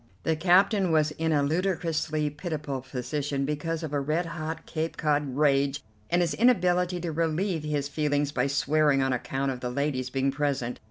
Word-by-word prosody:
The 160 - +1
captain 185 +3 +3
was 155 -1 +3
in 160 +1 -1
a 145 -2 +3
ludicrously 160 -1 0
pitiable 150 -4 -4
position 135 +2 -3
because 155 +3 -2
of 150 -2 -5
a 145 - +1
red 155 +5 0
hot 160 -1 -5
Cape 160 0 -3
Cod 145 -3 0
rage 140 -1 +2 0.3
and 175 +1 +3
his 165 -3 -1
inability 180 -5 +2
to 170 -1 -3
relieve 165 +2 0
his 145 -2 -1
feelings 145 -1 0
by 135 -1 0
swearing 145 0 +2
on 135 -1 +1
account 135 +2 -2
of 125 - -5
the 125 - -3
ladies 130 -1 -1
being 135 +1 0
present. 135 -4 -2
150 Hz, 175 wpm, -27 LUFS, 140-165 Hz, 0.3 s, captain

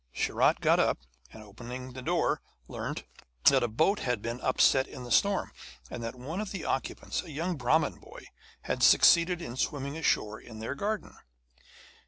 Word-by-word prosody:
Sharat - - +2
got - - +4
up, - - +2 0.3
and, 110 - -11
opening 125 +5 -8
the 130 - -7
door, - - 0 0.3
learnt - - -5 0.4
that 135 - +7
a 120 - +1
boat 160 - +2
had 125 -3 -1
been 115 +3 -5
upset 130 +1 +3
in 125 - -9
the 120 - -8
storm, 200 -1 +2 0.4
and 120 - -5
that 115 +1 -5
one 150 +10 -5
of 215 - -5
the 190 -5 -5
occupants, 135 - -2
a 175 - -12
young 165 +4 -2
Brahmin 150 +4 +1
boy, - - -13 0.4
had - - -3
succeeded 170 0 +5
in 120 - -6
swimming 140 +1 -2
ashore 110 -9 0
in 110 -2 -11
their 110 +4 -4
garden. 210 +8 -3
130 Hz, 175 wpm, -29 LUFS, 120-165 Hz, 0.4 s, that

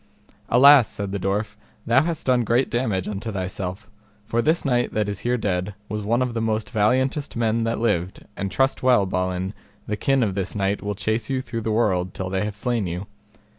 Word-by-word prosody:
Alas, 130 -1 +7
said 100 -1 -5
the 100 - -2
dwarf, 105 +3 -1 0.3
thou 120 +3 +4
hast 165 0 -3
done 125 -2 +3
great 120 +4 +1
damage 110 -7 0
unto 105 +2 -4
thyself, 95 +1 -4 0.4
for 115 +2 0
this 160 +6 +1
knight 120 -3 +1
that 105 -1 +1
is 100 -1 -3
here 125 +1 0
dead 95 -2 -2
was 105 0 -3
one 120 +5 +1
of 125 -2 -3
the 115 - -2
most 110 -1 -1
valiantest 130 +7 +1
men 115 0 +1
that 115 0 -1
lived, 100 -5 -1
and 100 - -3
trust 135 +6 +1
well, 125 -6 +4
Balin, 90 +1 -2 0.3
the 105 - -2
kin 135 +5 +2
of 100 -4 0
this 95 0 -3
knight 100 0 0
will 105 0 -3
chase 110 +3 -1
you 135 -1 0
through 115 -3 -5
the 110 - -3
world 95 -5 +1
till 95 -1 -4
they 95 +1 0
have 105 -1 -4
slain 115 -1 -1
you. 90 +3 -4
110 Hz, 210 wpm, -23 LUFS, 95-120 Hz, 0.4 s, Alas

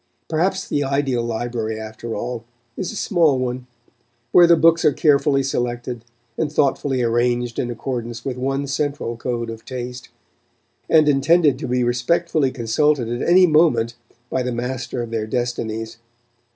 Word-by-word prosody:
Perhaps 190 +4 0
the 145 - 0
ideal 135 -3 0
library, 115 -1 -3
after 110 +1 -6
all, 120 +1 -4 0.3
is 185 - -4
a - - -8
small 165 -10 +2
one, 125 0 -3 0.6
where 175 -1 +7
the 170 - +7
books 165 +1 +4
are - - +5
carefully 140 -2 +3
selected 120 -2 -3 0.4
and 155 -3 0
thoughtfully 135 -3 +1
arranged 120 0 0
in 120 - -1
accordance 120 -1 -5
with 135 -2 -2
one 135 +2 -2
central 140 -3 -2
code 120 -1 -3
of 115 0 -10
taste, 125 -1 -7 0.8
and 155 -2 +5
intended 145 +1 +3
to - - -4
be 125 0 +1
respectfully 135 +5 +1
consulted 130 +1 0
at 120 +6 -2
any 185 +1 +7
moment 150 -8 +3 0.4
by 130 - 0
the 125 0 -2
master 125 0 -3
of 115 - -8
their 110 -2 -2
destinies. 115 -2 -3
125 Hz, 150 wpm, -21 LUFS, 120-145 Hz, 0.8 s, where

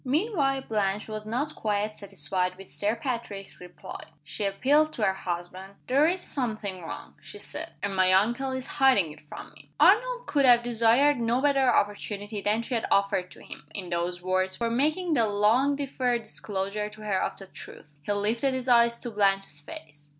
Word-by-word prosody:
Meanwhile, 280 - +1
Blanche 205 -1 -1
was 215 -1 -6
not 275 +7 -2
quite 210 0 -2
satisfied 185 -1 -2
with 195 0 -12
Sir 210 +2 0
Patrick's 230 -8 -5
reply. 180 -1 -10 0.2
She 180 +7 -4
appealed 290 +10 +2
to 220 - -3
her 190 - +3
husband. 185 +2 -6
"There 280 +5 +4
is 360 +2 0
something 215 - -4
wrong," 165 - -8
she - - -10
said - - -6
"and 200 -1 -2
my 185 0 +4
uncle 235 +8 +2
is 260 -1 -4 0.2
hiding 205 - +5
it 150 - -14
from 150 - -10
me." 145 -1 -18
Arnold 485 +9 +4
could 290 -1 +1
have 240 -2 +6
desired 240 +4 +3
no 235 +1 +1
better 270 -2 +3
opportunity 205 0 -1
than 210 +3 +1
she 250 - -5
had 230 - -1
offered 200 -2 +1
to - - -14
him, 150 - -11
in 185 -3 -5
those 175 +1 -2
words, 185 0 0
for 230 +2 -2
making 310 +8 +1
the 230 -6 +3
long 220 +7 +3
deferred 255 -4 -1
disclosure 210 -1 -3
to 215 0 -13
her 195 -3 0
of - - -2
the 195 - -9
truth. 150 -4 -13
He 145 - -3
lifted 225 +6 0
his 260 0 -4
eyes 235 -1 +5
to 240 - -5
Blanche's 195 -6 +1
face. 145 0 -12
215 Hz, 185 wpm, -27 LUFS, 195-260 Hz, 0.2 s, have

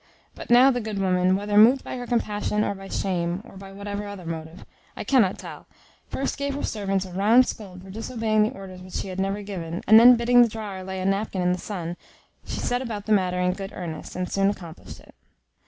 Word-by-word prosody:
But - - -10
now 250 +3 +7
the 245 -1 -2
good 215 -2 -5
woman, 185 -1 +2
whether 205 +1 +2
moved 250 +5 +6
by 245 - -5
compassion, 210 -3 0
or - - -1
by 195 0 -10
shame, 180 0 -2
or 240 - -14
by 195 0 -10
whatever 200 +1 -5
other 200 -3 -8
motive, 160 0 -7 0.3
I - - -4
cannot 225 -9 +3
tell, - - -10 0.4
first 275 - -3
gave 280 -1 -2
her 285 - -4
servants 195 -3 -1
a 185 - -10
round 220 +7 +5
scold 185 -6 -8
for 190 - -11
disobeying 225 0 -1
the 215 - +1
orders 185 -2 -10
which 185 0 -12
she 195 - -3
had 185 0 -5
never 195 +2 -1
given, 175 -4 -5
and 220 +1 +8
then 245 +2 +9
bidding 245 +1 +5
the 240 - +6
drawer 210 -3 -6
lay 190 0 -5
a 185 - -3
napkin 195 -1 0
in 180 - +2
the 180 - -1
Sun, 175 -4 -5 0.5
she - - -5
set 245 +1 -1
about 215 -5 -5
the 220 - -3
matter 185 -3 +2
in 180 0 +1
good 195 +1 -7
earnest, 165 -3 -7
and 180 0 -2
soon 195 0 +2
accomplished 175 -5 -8
it. - - -19
200 Hz, 225 wpm, -24 LUFS, 185-220 Hz, 0.5 s, then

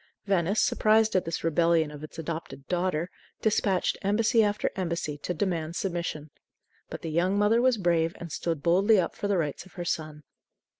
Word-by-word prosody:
Venice, 195 +1 +1
surprised 220 0 +3
at 185 - +2
this 165 0 -3
rebellion 165 -1 +2
of 150 0 -10
its 155 - -10
adopted 155 -4 -6
"daughter," 175 -2 0 0.4
dispatched 200 -3 +1
embassy 220 +3 +3
after 210 0 0
embassy 170 -5 -2
to 180 - -4
demand 170 -2 -2
submission. 170 -6 -3 0.6
But - - -7
the 165 - -3
young 180 +5 +1
mother 210 +3 +3
was 255 -2 +3
brave 170 -3 +1
and 170 -2 -8
stood 165 -2 -3
boldly 195 +5 +4
up 175 - -1
for 205 - -3
the 200 -2 +1
rights 155 +2 -3
of - - -20
her 175 -2 -6
son. 155 -2 -3
175 Hz, 180 wpm, -27 LUFS, 160-200 Hz, 0.6 s, boldly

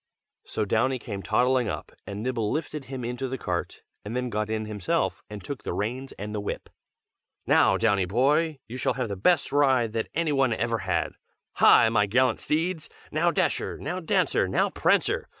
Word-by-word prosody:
So 110 - -1
Downy 120 +6 +1
came 105 -5 -6
toddling 125 +2 +2
up, - - -5 0.2
and 100 +2 -5
Nibble 115 -4 -1
lifted 150 -2 -3
him 130 -3 -6
into 125 +2 -3
the 130 +1 -4
cart, 90 -6 -4 0.2
and 105 +3 -5
then 125 -1 -2
got 105 0 -1
in 110 0 -2
himself, 105 -4 -1
and 105 -2 -8
took 140 - -6
the - - -4
reins 125 +6 -3
and 105 +1 -6
the 105 - -2
whip. 100 - -5 0.7
"Now, 95 - +4
Downy 100 -3 +2
boy, 145 - +2
you 125 - -7
shall - - +1
have 125 -4 -2
the 100 - -3
best 145 - +2
ride 130 -6 +3
that 115 -1 -2
any 165 -1 +1
one 135 -4 +2
ever 115 0 -1
had. 95 -2 -1 0.4
Hi! - - +7
my 105 -2 +2
gallant 125 +3 +2
steeds! 160 +1 -1 0.2
Now 160 +3 +2
Dasher, - - 0
now 175 +6 -4
Dancer, 165 - +1
now - - +1
Prancer! - - +1
120 Hz, 185 wpm, -26 LUFS, 105-135 Hz, 0.7 s, Hi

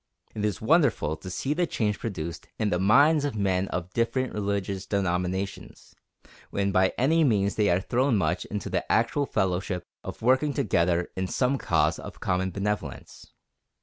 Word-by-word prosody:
It 105 - -4
is 105 -2 -1
wonderful 125 - +2
to 95 - -9
see 135 +10 -2
the 175 +2 0
change 105 -7 -1
produced 85 -7 -5
in 105 -2 0
the 90 - +1
minds 140 - +5
of 145 -5 -2
men 95 -2 0
of 90 0 -5
different 125 +2 0
religious 100 -2 -2
denominations, 95 0 -3 0.6
when 100 0 0
by 95 0 +3
any 160 +6 +3
means 100 -7 +2
they 105 -1 +2
are 90 +1 +3
thrown 125 +3 +1
much 90 -2 0
into 105 -2 -5
the - - -2
actual 125 +5 +2
fellowship 90 -1 -1 0.2
of - - -8
working 130 +4 +3
together 90 - +1
in 95 0 -2
some 130 +6 0
cause 80 -1 +1
of - - -9
common 90 +1 0
benevolence. 100 +2 -4
100 Hz, 165 wpm, -26 LUFS, 90-125 Hz, 0.6 s, minds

